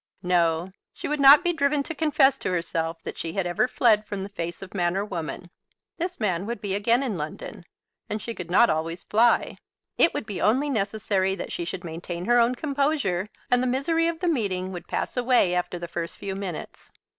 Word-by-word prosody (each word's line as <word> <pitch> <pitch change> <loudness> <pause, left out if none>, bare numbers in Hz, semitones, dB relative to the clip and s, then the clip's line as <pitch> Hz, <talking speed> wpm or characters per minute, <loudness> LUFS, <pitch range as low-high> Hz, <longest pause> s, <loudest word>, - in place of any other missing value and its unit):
No; 175 0 +1 0.2
she - - -5
would 300 0 -1
not 280 +3 +8
be 350 -1 +1
driven 280 -2 +1
to 330 - -5
confess 295 -3 +3
to - - -2
herself 165 -2 -2
that - - -6
she 165 -1 -4
had 195 -1 -1
ever 175 +7 +1
fled 220 -4 +3
from 200 -2 -4
the 195 - -6
face 170 -2 -5
of 190 - -11
man 175 -1 0
or 200 - -1
woman. 175 -2 -6 0.5
This 355 +2 -3
man 195 -3 -1
would 235 -2 -3
be 200 -2 -3
again 230 +6 +2
in 215 -10 -2
London, 155 +3 -7 0.4
and 210 - -2
she 230 - -5
could 180 -6 -7
not 215 +7 +6
always 165 +1 -2
fly. 230 +2 +2 0.4
It 335 - +6
would - - -3
be 205 -3 -5
only 270 +7 +2
necessary 200 -3 0
that 190 - -6
she 170 - -3
should 175 +1 -5
maintain 170 +1 -6
her 240 +1 +4
own 235 +2 +3
composure, 275 - 0 0.2
and 245 0 +4
the 255 - 0
misery 325 +6 +1
of 335 0 -3
the 360 - 0
meeting 195 - -1
would 175 -2 -8
pass - - -3
away 245 -7 +3
after 180 0 -1
the 175 0 -6
first 170 0 -5
few 195 -1 -4
minutes. 190 -4 -7
200 Hz, 215 wpm, -25 LUFS, 175-255 Hz, 0.5 s, not